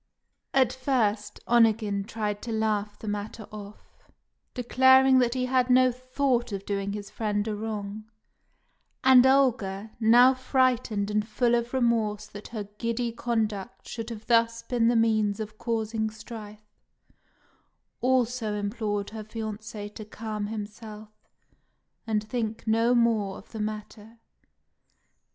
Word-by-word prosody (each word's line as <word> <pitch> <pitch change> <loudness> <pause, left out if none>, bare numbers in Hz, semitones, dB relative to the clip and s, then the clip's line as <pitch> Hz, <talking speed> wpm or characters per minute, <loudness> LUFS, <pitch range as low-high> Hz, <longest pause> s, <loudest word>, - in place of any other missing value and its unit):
At 260 -3 +4
first, 220 -6 -1
Onegin 220 -4 +3
tried 210 -2 -3
to 235 - -5
laugh 215 -2 -1
the 220 - -9
matter 210 +2 -4
off, 210 -1 -12 0.5
declaring 260 +1 +5
that 245 0 +1
he 255 -1 0
had 255 0 +1
no 255 0 +5
thought 255 -1 -1
of 200 -1 -5
doing 200 0 -2
his 205 -1 -7
friend 210 -1 -1
a 215 - -1
wrong; 210 -1 -5 1.0
and 260 -1 +7
Olga, 225 -7 +2
now 240 +3 +6
frightened 255 -5 +1
and 210 0 0
full 240 +2 +1
of 235 0 0
remorse 230 -5 +1
that 205 +1 -10
her 220 -3 -5 0.2
giddy 230 0 -1
conduct 215 -5 -3
should 225 -1 -6
have 220 -2 -8
thus 230 -1 +2
been 235 -2 +1
the 240 - +3
means 215 -2 +2
of 215 0 -7
causing 220 -1 -1
strife, 215 -1 -11 1.3
also 245 -3 +1
implored 205 0 -2
her 220 -1 -6
fiancé 215 -1 -6
to 215 - -8
calm 215 -1 -5
himself 215 0 -7 1.0
and 215 -1 0
think 225 -1 -4
no 230 +2 +3
more 220 -5 +2
of - - -15
the 220 - -7
matter. 215 +1 -6
220 Hz, 135 wpm, -27 LUFS, 210-240 Hz, 1.3 s, and